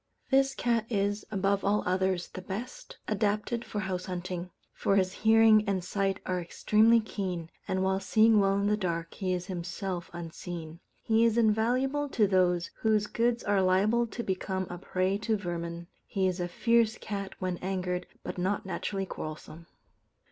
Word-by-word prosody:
This 270 0 +3
cat 230 -2 0
is, 205 -1 0
above 200 -1 0
all 205 +1 +2
others, 185 -1 0
the 185 - -8
best 205 +7 -7
adapted 215 +2 0
for 210 - -4
house 185 -2 -3
hunting; 180 -1 -4 0.2
for 195 - +1
his 185 -1 +2
hearing 220 0 +5
and 190 -2 0
sight 195 +1 -1
are 180 -1 -1
extremely 220 +6 +4
keen, 185 -6 -4 0.2
and 190 0 0
while 190 0 +1
seeing 215 +3 +4
well 195 0 +3
in 200 - 0
the 210 +1 +3
dark, 170 -4 -3
he 190 -3 -2
is 180 -1 -1
himself 180 0 -4
unseen. 170 -1 -7 0.2
He 225 0 +3
is 230 -1 +3
invaluable 250 +6 +2
to 220 -5 +3
those 180 -3 +2
whose 215 -2 +2
goods 235 +2 0
are 200 -1 +2
liable 205 +6 +3
to 235 +2 -5
become 190 -1 -2
a 175 - -6
prey 185 +2 0
to 220 0 0
vermin. 170 -2 -4 0.2
He 190 -1 0
is 185 0 0
a 175 - -1
fierce 230 +4 +2
cat 200 -2 -5
when 185 -1 -2
angered, 180 -1 -2 0.2
but - - -5
not 195 +3 -1
naturally 195 0 -3
quarrelsome. 155 -1 -8
195 Hz, 170 wpm, -29 LUFS, 180-215 Hz, 0.2 s, hearing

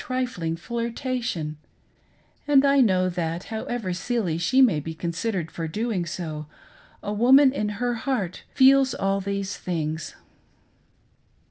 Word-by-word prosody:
trifling 245 -11 -2
flirtation; 230 - -3 0.9
and 280 -1 +5
I 280 0 +5
know 185 -6 +3
that, 170 -1 -3
however 220 -3 -3
silly 185 -4 -1
she 170 +10 +2
may 235 - +5
be 160 +2 -6
considered 170 +1 -3
for 165 -1 -4
doing 205 0 -2
so, 155 -3 -5 0.6
a 205 - -3
woman 260 +5 +6
in 210 -6 -1
her 245 +1 0
heart 225 -6 -2
feels 265 -1 +5
all 195 0 0
these 200 0 -3
things. 160 -3 -3
200 Hz, 125 wpm, -25 LUFS, 170-245 Hz, 0.9 s, woman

